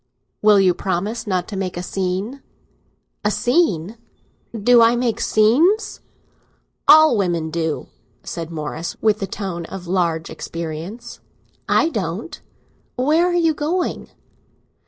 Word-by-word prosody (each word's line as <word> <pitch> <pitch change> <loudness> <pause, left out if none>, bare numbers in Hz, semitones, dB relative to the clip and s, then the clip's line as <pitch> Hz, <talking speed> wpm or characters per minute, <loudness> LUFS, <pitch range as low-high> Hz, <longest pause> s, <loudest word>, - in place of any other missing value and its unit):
"Will 210 -1 +6
you 185 -2 +4
promise 200 +6 -3
not 185 -3 -1
to 210 - -6
make 190 -2 -3
a 175 - -4
scene?" 195 +8 -3 0.8
"A 210 - +2
scene!—do 230 - 0
I 230 +1 +5
make 240 -2 -1
scenes?" 290 - +2 0.9
"All 310 -3 +8
women 170 -6 -1
do!" 160 -1 -2 0.4
said 165 -2 -6
Morris, 160 +1 -5
with 215 -1 +2
the 195 - -3
tone 185 -4 -5
of 185 +1 -8
large 170 -3 -1
experience. 165 +7 -7 0.5
"I 325 - +3
don't. 205 - -4 0.5
Where 310 +7 +2
are 360 - 0
you 330 -2 +3
going?" 320 +5 -2
205 Hz, 120 wpm, -20 LUFS, 175-245 Hz, 0.9 s, All